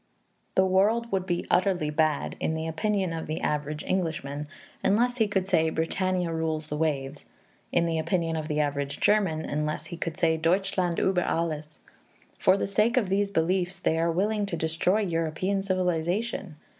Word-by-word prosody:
The 190 - +5
world 210 +5 +2
would 190 -1 -1
be 175 -1 -1
utterly 180 -5 +2
bad, 155 -1 +1
in 160 - -1
the 160 0 -3
opinion 190 +2 0
of 165 -1 -4
the 155 +1 -2
average 150 0 -2
Englishman, 150 -5 -2 0.4
unless 245 +5 +2
he 220 -3 +3
could 190 -2 0
say 160 -4 +3
"Britannia 180 +2 0
rules 160 -1 -2
the 150 - -2
waves"; 145 -2 -2 0.4
in 170 - +2
the 165 -1 0
opinion 165 0 0
of 155 -1 -3
the 150 -1 -1
average 140 -1 -1
German, 190 -7 +2
unless 150 +1 -2
he 170 - -7
could 165 -1 -4
say 160 -3 +2
"Deutschland 180 +1 +1
über 190 -2 +2
alles." 155 -2 -2 0.6
For 190 +1 +4
the - - -1
sake 210 +5 +2
of 215 -7 +2
these 200 +1 +1
beliefs, 180 +1 0
they 160 -2 +1
are 165 +1 +2
willing 205 +4 0
to 170 - -3
destroy 165 +6 +1
European 175 +2 -1
civilization. 185 +1 -1
170 Hz, 170 wpm, -27 LUFS, 160-195 Hz, 0.6 s, The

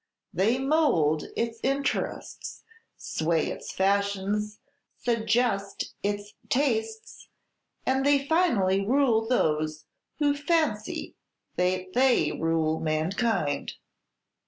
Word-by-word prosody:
They 210 +8 +2
mould 265 - +2
its 230 0 -2
interests, 275 +2 -2 0.3
sway 160 0 -1
its - - -7
fashions, 200 +2 0 0.4
suggest 225 -3 0
its 205 +1 -3 0.2
tastes, 225 -5 -1 0.6
and 265 +1 +1
they 280 0 +3
finally 225 - +2
rule 230 -1 +2
those 155 -9 0 0.3
who 290 -1 +2
fancy 290 -8 -1 0.4
that 185 +1 -1
they 255 0 +3
rule 160 -1 0
mankind." 155 +1 -1
210 Hz, 85 wpm, -27 LUFS, 185-260 Hz, 0.6 s, they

